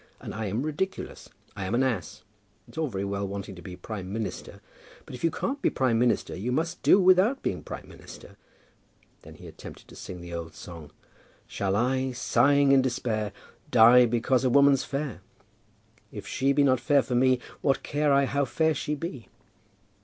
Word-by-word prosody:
And - - -8
I 110 0 -3
am 110 +7 -2
ridiculous. 155 +6 -4 0.3
I 95 - -4
am 100 +5 -1
an 130 - +2
ass. 115 -10 -3 0.4
It's - - -17
all 160 -1 -1
very 100 -5 -4
well 100 0 -3
wanting 100 0 -6
to 90 - -12
be 90 +2 -8
prime 95 0 -7
minister; 110 0 -5 0.5
but - - -11
if 125 - -9
you 165 - +4
can't 275 - -3
be - - +3
prime 125 -4 +1
minister, 120 0 +1
you 110 +7 -3
must 165 +6 -2
do 195 - +5
without 190 +8 +4
being 90 - -2
prime - - -8
minister." - - -13 0.9
Then - - -13
he - - -14
attempted - - -11
to - - -13
sing 90 - -8
the 85 0 -9
old 80 -2 -6
song 80 -4 -10 0.6
"Shall 100 -1 -2
I, 130 +3 0
sighing 140 +3 +3
in 135 -1 +6
despair, 115 -5 -2 0.4
die 120 +1 +7
because 120 +3 +1
a 130 - +3
woman's 140 +1 +5
fair? 140 -8 -4 0.9
If 105 - -8
she 135 +2 0
be 145 +1 +3
not 130 -3 +3
fair 140 +2 +3
for 125 - -5
me, 130 +1 +4 0.2
what 135 - +1
care 145 0 0
I 140 0 +4
how 140 +1 0
fair 160 +4 +1
she 150 +1 -3
be?" 140 -6 -7
125 Hz, 190 wpm, -27 LUFS, 105-140 Hz, 0.9 s, die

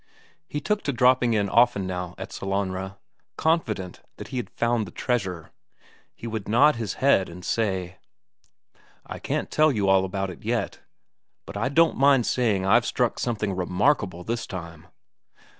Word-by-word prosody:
He 150 - -3
took 210 +6 -1
to 140 - +1
dropping 125 -1 +3
in 100 -1 +1
often 115 -2 +3
now 90 -1 -4
at - - -7
Sellanraa, 95 0 -3 0.4
confident 110 - -1 0.2
that - - -9
he 130 - -5
had 125 - -3
found 120 -3 0
the - - -10
treasure; 95 -10 -2 0.6
he - - -10
would 110 -3 -4
nod 140 +8 +5
his 110 -3 -3
head 130 -9 +3
and 90 +1 -10
say: 95 -4 -1 1.1
"I - - -7
can't - - -3
tell 155 0 +4
you 105 -6 0
all 95 0 +4
about 95 0 -3
it 90 - -13
yet, - - -2 0.7
but - - -10
I 130 - 0
don't 165 +3 +3
mind 135 -3 +4
saying 105 -7 +1
I've 120 +5 +4
struck 120 -2 0
something 105 -5 -2
remarkable 90 - 0
this 115 +4 -3
time." 85 -2 -8
105 Hz, 160 wpm, -25 LUFS, 95-125 Hz, 1.1 s, nod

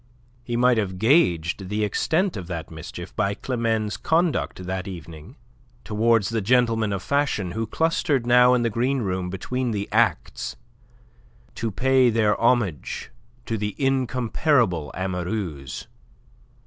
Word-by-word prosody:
He 120 0 -3
might 125 -1 +4
have 95 -3 -2
gauged 95 - +2
the 105 +1 -1
extent 165 - 0
of 95 -4 -6
that 85 -3 -5
mischief 80 -1 -8
by 100 +1 0
Climene's 115 -3 -1
conduct 160 - 0
that 95 +1 -3
evening 85 - -9 0.5
towards 110 0 +2
the 115 -1 -1
gentlemen 115 -1 +2
of 100 -1 -3
fashion 140 -10 0
who 110 +2 -3
clustered 150 -2 0
now 125 +1 +6
in 120 - +1
the 115 - 0
green 125 +3 0
room 90 -2 -2
between 125 +7 -3
the 100 -3 -2
acts - - 0 1.0
to 115 - -3
pay 130 +3 +3
their 110 -2 +2
homage 115 - 0 0.3
to 115 -1 -2
the 105 0 -3
incomparable 125 - +1
amoureuse. 90 - -4
110 Hz, 135 wpm, -24 LUFS, 95-125 Hz, 1.0 s, now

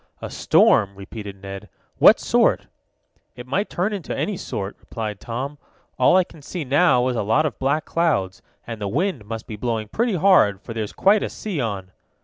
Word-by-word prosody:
"A - - -7
storm," 100 0 +3
repeated 100 0 -9
Ned. 95 0 -8 0.3
"What - - +7
sort?" - - +2 0.7
"It 125 0 -9
might 190 +11 -1
turn 190 +5 -1
into 195 -5 -4
any 210 - -1
sort," 100 - -5
replied 105 -3 -6
Tom. 135 +5 -5 0.4
"All - - +5
I 185 - +5
can 165 -3 -16
see 165 +4 -5
now 135 -2 +3
is 125 - -2
a - - 0
lot 110 +10 +2
of 140 -8 -3
black 140 +4 0
clouds, 145 - 0 0.2
and 115 -2 -7
the 100 - -2
wind 145 - -1
must 115 +1 -6
be 110 - -7
blowing 110 -1 -2
pretty 230 - 0
hard, 160 - +4
for 115 - -7
there's 110 -2 -4
quite 205 +2 +3
a - - -2
sea 190 -10 -4
on." 100 -5 -4
125 Hz, 190 wpm, -22 LUFS, 105-170 Hz, 0.7 s, What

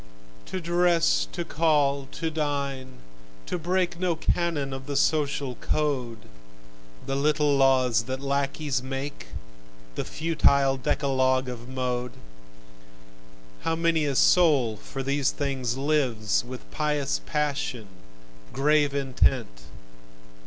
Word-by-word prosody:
To 185 - -4
dress, 175 0 +2
to 175 -2 -4
call, 145 -4 +1
to 165 -1 -3
dine, 140 -4 -3 0.4
to 180 - -3
break 175 +1 0
No 180 -2 +1
canon 160 -4 -1
of 135 +1 -7
the 145 - -3
social 140 -2 +1
code, 130 -4 -2 0.9
The 135 - -2
little 150 0 +2
laws 130 -4 +4
that 130 0 -4
lacqueys 140 0 -1
make, 135 - -5 0.7
The - - -3
futile 140 -4 +2
decalogue 130 -1 +1
of 120 0 -8
Mode, 125 -1 -2 1.5
How 165 - 0
many 165 -2 +1
a 140 -2 -1
soul 140 -10 +4
for 135 +5 -7
these 140 0 +1
things 130 -4 -2
lives, 130 -9 +1
With 125 +1 -10
pious 150 -2 -1
passion, 145 -7 -2 0.7
grave 145 +1 +2
intent! 130 - 0
140 Hz, 110 wpm, -26 LUFS, 130-155 Hz, 1.5 s, laws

